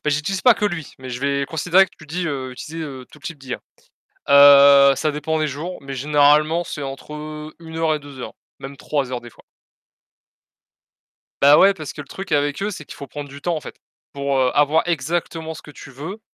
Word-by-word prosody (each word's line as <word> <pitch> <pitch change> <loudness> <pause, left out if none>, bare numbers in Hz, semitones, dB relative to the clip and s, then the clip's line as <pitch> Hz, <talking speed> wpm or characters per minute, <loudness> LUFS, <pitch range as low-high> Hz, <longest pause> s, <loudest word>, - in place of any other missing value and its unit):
Bah, 150 - +1
j'utilise 150 +6 -2
pas 250 -2 +7
que 210 - -3
lui, 175 -6 -3
mais 130 0 -9
je 125 +1 -5
vais 140 0 0
considérer 175 +5 +3
que - - -23
tu 155 - -14
dis, 175 +4 -3
heu: 135 -4 -4
«Utiliser, 160 +5 -7
heu, 130 -3 -9
tout - - -16
type 155 +1 -7
d'IA». 130 -2 -6 0.7
Heu, 140 0 +8
ça 155 +3 -1
dépend 150 +2 -2
des 155 - 0
jours, 155 +6 -6
mais 140 0 -7
généralement 150 +4 +3
c'est 150 -3 -6
entre, 135 +2 -8
heu, 150 0 -8
1 160 -1 -9
heure 160 -1 +1
et - - -5
2 140 -2 -12
heures, - - -7 0.3
même 135 +1 -9
3 140 -3 -2
heures 125 - -3
des 120 - -11
fois. - - -21 2.0
Bah, 145 +1 +7
ouais, 195 - +6
parce 155 -7 -8
que 145 - -7
le - - -18
truc 190 +4 -8
avec 145 +3 0
eux, 205 - -1
c'est 180 -6 -8
qu'il - - -11
faut 140 - -8
prendre 145 +2 -8
du 140 +1 -11
temps 175 +2 -1
en 155 - -4
fait. - - -9 0.4
Pour 140 -1 -1 0.2
avoir 150 +2 +3
exactement 165 +1 -2
ce - - -11
que - - -13
tu 145 - -12
veux, 160 - -8
150 Hz, 225 wpm, -21 LUFS, 140-160 Hz, 2.0 s, Heu